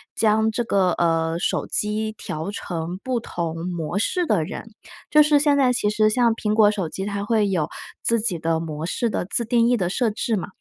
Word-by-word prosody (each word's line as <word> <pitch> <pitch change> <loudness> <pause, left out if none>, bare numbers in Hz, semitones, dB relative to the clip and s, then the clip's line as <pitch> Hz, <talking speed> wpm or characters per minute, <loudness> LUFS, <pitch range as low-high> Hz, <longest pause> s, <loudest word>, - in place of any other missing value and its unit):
将 220 0 +3
这 230 +2 -1
个， 195 -5 +2
呃， 165 -1 +1
手 - - -1
机 215 +1 -1
调 155 +4 -5
成 175 -2 -5
不 255 -2 -1
同 170 -5 -4
模 175 +1 -3
式 355 - 0
的 160 - +1
人。 - - -6 0.5
就 300 - +7
是 295 -1 +4
现 290 -1 +3
在 255 -3 +3
其 210 -3 +1
实 215 0 +3
像 235 0 +3
苹 210 -2 -1
果 215 -1 +5
手 195 -6 -2
机 190 +4 -5
它 200 0 -3
会 215 -2 +2
有 170 -6 0 0.3
自 230 -1 +1
己 200 -7 -1
的 160 0 0
模 155 -1 -5
式 230 +6 -1
的 - - -2
自 220 +5 -1
定 235 0 +2
义 245 - +3
的 185 -6 -1
设 230 +4 +1
置 220 +1 -1
嘛。 - - -4
210 Hz, 230 characters per minute, -23 LUFS, 170-230 Hz, 0.5 s, 就